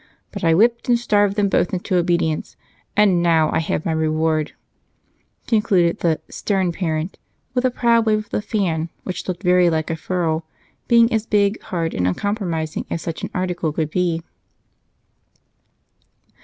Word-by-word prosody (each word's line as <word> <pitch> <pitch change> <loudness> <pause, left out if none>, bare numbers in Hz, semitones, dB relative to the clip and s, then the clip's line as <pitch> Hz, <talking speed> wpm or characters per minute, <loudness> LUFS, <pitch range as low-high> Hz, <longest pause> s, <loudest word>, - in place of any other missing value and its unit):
But 200 -1 -7
I 165 -1 +4
whipped 235 +6 +2
and 240 - +5
starved 205 -4 +2
them 205 -1 +2
both 190 -1 +1
into 185 +1 -2
obedience, 170 -3 0 0.4
and 195 -4 +4
now 165 -2 +3
I - - +1
have 160 -1 -2
my 165 - 0
reward," 155 -1 0 0.9
concluded 195 -7 +2
the 165 -2 +1
"stern 190 -4 -1
parent" 165 -1 -3 0.3
with 250 0 0
a - - +4
proud 235 -2 +2
wave 215 -1 +4
of 215 -1 -6
the - - -1
fan, 175 -7 -1
which 185 - -5
looked 185 0 -4
very 180 -1 +4
like 160 -1 -1
a - - -1
ferule, 165 -1 -1 0.4
being 235 -1 +5
as 220 0 0
big, 205 0 +2
hard, 165 -3 -3
and 90 -1 0
uncompromising 165 - -2
as 165 - -3
such 165 -1 -5
an - - -4
article 180 -3 -1
could 155 0 -2
be. 170 -2 0
180 Hz, 160 wpm, -21 LUFS, 160-205 Hz, 0.9 s, and